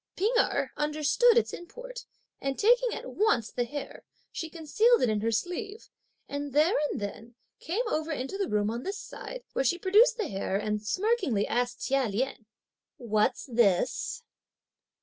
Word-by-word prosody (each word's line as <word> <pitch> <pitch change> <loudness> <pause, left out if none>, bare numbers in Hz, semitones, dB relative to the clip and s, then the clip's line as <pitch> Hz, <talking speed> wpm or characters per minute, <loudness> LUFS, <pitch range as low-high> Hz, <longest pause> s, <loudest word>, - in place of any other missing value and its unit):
P'ing 420 +6 +1
Erh - - +1
understood 305 - +3
its 470 - +2
import, - - -9 0.3
and 275 -1 -2
taking 485 +3 +4
at - - -5
once 270 - +1
the 245 - -1
hair, 285 +4 -7 0.3
she 325 - -5
concealed 425 +10 +3
it 245 - +3
in 210 -1 0
her 230 +1 0
sleeve, 400 - -3 0.4
and 285 -1 -5
there 310 +7 +4 0.2
and - - -3
then 220 +3 -7 0.2
came 380 +10 -1
over 315 -5 -1
into 270 +3 -3
the 390 -2 -1
room 210 0 +1
on 235 +1 -4
this 390 +8 -4
side, - - -8
where - - +1
she 270 +7 +2
produced 435 +6 +4
the 435 - -1
hair, 195 -1 -3
and 210 +1 -1
smirkingly 365 - +1
asked 245 0 -1
Chia 270 -2 +1
Lien, 220 +1 -3 0.5
"What's 215 -3 0
this?" 230 -4 +1
295 Hz, 165 wpm, -28 LUFS, -, 0.5 s, taking